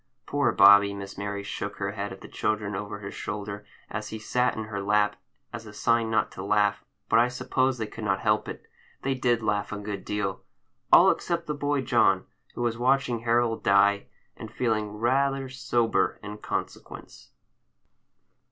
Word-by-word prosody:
Poor 145 Hz, -2 st, +1 dB
Bobby! 100 Hz, 0 st, +7 dB
Miss 100 Hz, 0 st, -8 dB
Mary 100 Hz, 0 st, -4 dB
shook 100 Hz, 0 st, -5 dB
her 100 Hz, 0 st, -2 dB
head 100 Hz, -1 st, -5 dB
at 95 Hz, -, -10 dB
the -, -, -10 dB
children 105 Hz, -1 st, -2 dB
over 100 Hz, +1 st, -5 dB
his 100 Hz, -, -7 dB
shoulder, 105 Hz, 0 st, -5 dB, 0.2 s
as 105 Hz, 0 st, -5 dB
he 110 Hz, -, -5 dB
sat 125 Hz, +3 st, 0 dB
in 110 Hz, -, -3 dB
her 105 Hz, -2 st, -5 dB
lap, 105 Hz, +1 st, +2 dB, 0.4 s
as 115 Hz, -2 st, -7 dB
a 105 Hz, -, -11 dB
sign 115 Hz, +1 st, +1 dB
not 110 Hz, -, +1 dB
to 95 Hz, -, -7 dB
laugh, 105 Hz, 0 st, +1 dB, 0.2 s
but 115 Hz, -, +4 dB
I 120 Hz, -, +4 dB
suppose 130 Hz, +1 st, 0 dB
they 110 Hz, -, -2 dB
could -, -, -9 dB
not -, -, 0 dB
help -, -, +1 dB
it. -, -, -8 dB, 0.4 s
They 135 Hz, -, +1 dB
did 120 Hz, -3 st, +1 dB
laugh 105 Hz, -1 st, -1 dB
a 105 Hz, -, -3 dB
good 105 Hz, 0 st, -5 dB
deal,—all 105 Hz, 0 st, +1 dB
except 170 Hz, -1 st, -2 dB
the 150 Hz, -, -2 dB
boy 145 Hz, -1 st, -1 dB
John, 130 Hz, -, +3 dB, 0.3 s
who 120 Hz, -, -3 dB
was 115 Hz, -1 st, -1 dB
watching 130 Hz, -1 st, +2 dB
Harold 115 Hz, 0 st, +1 dB
die, 100 Hz, 0 st, +3 dB, 0.3 s
and -, -, -9 dB
feeling 110 Hz, -4 st, -1 dB
rather 135 Hz, +3 st, +1 dB
sober 120 Hz, -3 st, 0 dB
in 105 Hz, +1 st, -7 dB
consequence. -, -, -6 dB
110 Hz, 175 wpm, -26 LUFS, 100-120 Hz, 0.4 s, Bobby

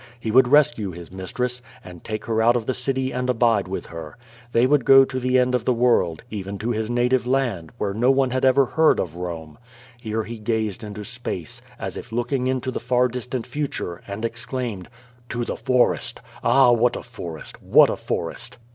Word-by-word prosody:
He 115 Hz, -1 st, -3 dB
would 130 Hz, +2 st, +6 dB
rescue 120 Hz, -7 st, +3 dB
his 85 Hz, -1 st, -10 dB
mistress, 125 Hz, +7 st, -3 dB, 0.2 s
and 90 Hz, -2 st, -11 dB
take 110 Hz, -1 st, -5 dB
her 110 Hz, -1 st, 0 dB
out 120 Hz, +2 st, +4 dB
of 120 Hz, -2 st, -1 dB
the 130 Hz, -, 0 dB
city 130 Hz, +1 st, -1 dB
and 125 Hz, +1 st, -2 dB
abide 115 Hz, -5 st, +2 dB
with 95 Hz, -, -4 dB
her. 80 Hz, +1 st, -9 dB, 0.3 s
They 120 Hz, +1 st, +4 dB
would 140 Hz, 0 st, +3 dB
go 135 Hz, +1 st, +7 dB
to 130 Hz, -1 st, -4 dB
the 130 Hz, 0 st, +2 dB
end 125 Hz, 0 st, +2 dB
of 125 Hz, -3 st, +1 dB
the 125 Hz, +1 st, +1 dB
world, 115 Hz, -9 st, +2 dB
even 100 Hz, -1 st, -5 dB
to 115 Hz, +4 st, -2 dB
his 110 Hz, -1 st, -2 dB
native 125 Hz, +1 st, +1 dB
land, 125 Hz, -11 st, -1 dB
where 100 Hz, -3 st, -2 dB
no 120 Hz, +5 st, +2 dB
one 135 Hz, -1 st, +3 dB
had 130 Hz, 0 st, -1 dB
ever 135 Hz, +1 st, +5 dB
heard 160 Hz, +5 st, +3 dB
of 85 Hz, -, -2 dB
Bome. 85 Hz, -2 st, -7 dB, 0.4 s
Here 110 Hz, -1 st, -2 dB
he 115 Hz, +1 st, -8 dB
gazed 110 Hz, -2 st, -2 dB
into 105 Hz, 0 st, -7 dB
space, 120 Hz, -8 st, -4 dB, 0.2 s
as -, -, -5 dB
if -, -, -9 dB
looking 120 Hz, +3 st, -1 dB
into 130 Hz, 0 st, -1 dB
the -, -, -3 dB
far 125 Hz, 0 st, +2 dB
distant 125 Hz, 0 st, -4 dB
future, 140 Hz, -, -4 dB
and 100 Hz, +3 st, -4 dB
exclaimed: 120 Hz, -4 st, -4 dB, 0.4 s
"To 120 Hz, 0 st, -2 dB
the -, -, -3 dB
forest! 125 Hz, -1 st, +1 dB, 0.2 s
Ah, 125 Hz, +1 st, +5 dB
what 120 Hz, +1 st, +3 dB
a -, -, -6 dB
forest! 90 Hz, -10 st, -9 dB
What -, -, +5 dB
a -, -, -2 dB
forest!" -, -, -5 dB
120 Hz, 200 wpm, -23 LUFS, 105-125 Hz, 0.4 s, go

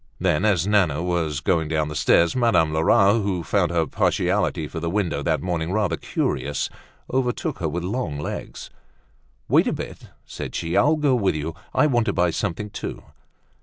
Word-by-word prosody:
Then 90 Hz, +1 st, +1 dB
as 95 Hz, -5 st, +2 dB
Nana 90 Hz, -7 st, +2 dB
was 80 Hz, -5 st, -1 dB
doing 80 Hz, -1 st, +1 dB
down 80 Hz, -1 st, 0 dB
the 75 Hz, -, -5 dB
stairs, 85 Hz, +2 st, +3 dB
Madame 115 Hz, -11 st, +3 dB
Lerat, 100 Hz, +7 st, +4 dB
who 95 Hz, -4 st, -2 dB
found 95 Hz, 0 st, +1 dB
her 85 Hz, -1 st, +1 dB
partiality 75 Hz, 0 st, 0 dB
for 80 Hz, -, -6 dB
the 85 Hz, +1 st, -2 dB
window 95 Hz, -2 st, -1 dB
that -, -, 0 dB
morning 85 Hz, -2 st, -2 dB
rather 105 Hz, -1 st, +1 dB
curious, 70 Hz, 0 st, -2 dB, 0.4 s
overtook 125 Hz, -6 st, -1 dB
her 80 Hz, -3 st, -1 dB
with 85 Hz, +3 st, -3 dB
her 90 Hz, -, -3 dB
long 120 Hz, -, -2 dB
legs. 75 Hz, -, -6 dB, 0.8 s
"Wait -, -, +4 dB
a -, -, +1 dB
bit," -, -, -7 dB, 0.2 s
said -, -, -7 dB
she. 85 Hz, +1 st, -2 dB
"I'll 150 Hz, +4 st, +4 dB
go 150 Hz, -3 st, +2 dB
with 100 Hz, -9 st, +1 dB
you. 75 Hz, +2 st, -3 dB, 0.2 s
I -, -, +3 dB
want 120 Hz, -6 st, +2 dB
to -, -, +1 dB
buy 90 Hz, -2 st, +2 dB
something 100 Hz, +6 st, -3 dB
too." -, -, -6 dB
90 Hz, 185 wpm, -23 LUFS, 80-105 Hz, 0.8 s, Lerat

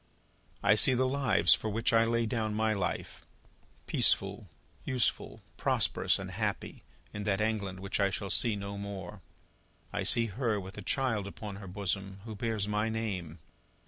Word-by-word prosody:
"I 105 Hz, -, +6 dB
see 130 Hz, +5 st, +6 dB
the 130 Hz, +1 st, +2 dB
lives 135 Hz, -1 st, +4 dB
for 110 Hz, -, -1 dB
which 115 Hz, +3 st, 0 dB
I 115 Hz, 0 st, +5 dB
lay 115 Hz, 0 st, +1 dB
down 110 Hz, -2 st, -1 dB
my 110 Hz, 0 st, +1 dB
life, 95 Hz, -3 st, -3 dB, 0.6 s
peaceful, -, -, +2 dB, 0.4 s
useful, 125 Hz, -5 st, 0 dB
prosperous -, -, +2 dB
and -, -, -6 dB
happy, -, -, -3 dB, 0.3 s
in 105 Hz, -, -5 dB
that 100 Hz, -2 st, +1 dB
England 105 Hz, -4 st, -1 dB
which 100 Hz, +2 st, -3 dB
I 100 Hz, -1 st, +3 dB
shall 95 Hz, 0 st, -4 dB
see 115 Hz, -3 st, +2 dB
no 100 Hz, 0 st, -5 dB
more. 100 Hz, -1 st, -7 dB, 0.7 s
I -, -, -1 dB
see 115 Hz, -, +4 dB
Her 110 Hz, 0 st, -1 dB
with 95 Hz, 0 st, -8 dB
a 105 Hz, -, -7 dB
child 115 Hz, -2 st, 0 dB
upon 100 Hz, 0 st, -7 dB
her 100 Hz, -1 st, -9 dB
bosom, 95 Hz, 0 st, -3 dB
who 110 Hz, -, -6 dB
bears 110 Hz, -1 st, -2 dB
my 105 Hz, +1 st, 0 dB
name. 95 Hz, -8 st, -4 dB
105 Hz, 165 wpm, -31 LUFS, 100-115 Hz, 0.7 s, I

